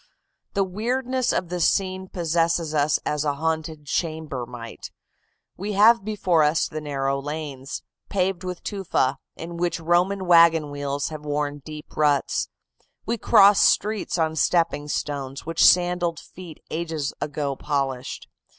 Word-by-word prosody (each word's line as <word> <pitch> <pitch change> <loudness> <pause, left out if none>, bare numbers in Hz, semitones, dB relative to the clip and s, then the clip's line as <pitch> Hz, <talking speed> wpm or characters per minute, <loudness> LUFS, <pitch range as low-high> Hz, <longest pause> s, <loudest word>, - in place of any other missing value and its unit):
"The 200 - +3
weirdness 250 +6 -1
of 175 - -1
the 180 0 -3
scene 190 +2 +1
possesses 165 -2 0
us 150 0 +2
as 150 0 -1
a 145 -2 0
haunted 160 0 -3
chamber 155 -5 -3
might. 115 -2 -9 0.7
We 205 +3 -4
have 215 +2 +6
before 190 -6 +1
us 150 +1 +2
the 155 - -6
narrow 140 -2 -1
lanes, 145 -2 -6 0.3
paved 190 -1 0
with 180 -1 -5
tufa, 145 -9 -1 0.2
in 170 +1 -7
which 175 0 -1
Roman 180 +4 +1
wagon 165 -3 +5
wheels 145 0 -3
have 155 -1 -8
worn 145 0 -2
deep 150 +1 -10
ruts. 145 -3 +1 0.6
We 230 0 -2
cross 200 -2 +6
streets 210 -3 +2
on 160 -1 0
stepping 160 -2 +1
stones 140 -2 -4
which 165 0 +1
sandaled 175 -1 +4
feet 175 -4 -12
ages 160 -3 -3
ago 145 -2 -2
polished. 135 -3 -3
160 Hz, 140 wpm, -24 LUFS, 145-180 Hz, 0.7 s, have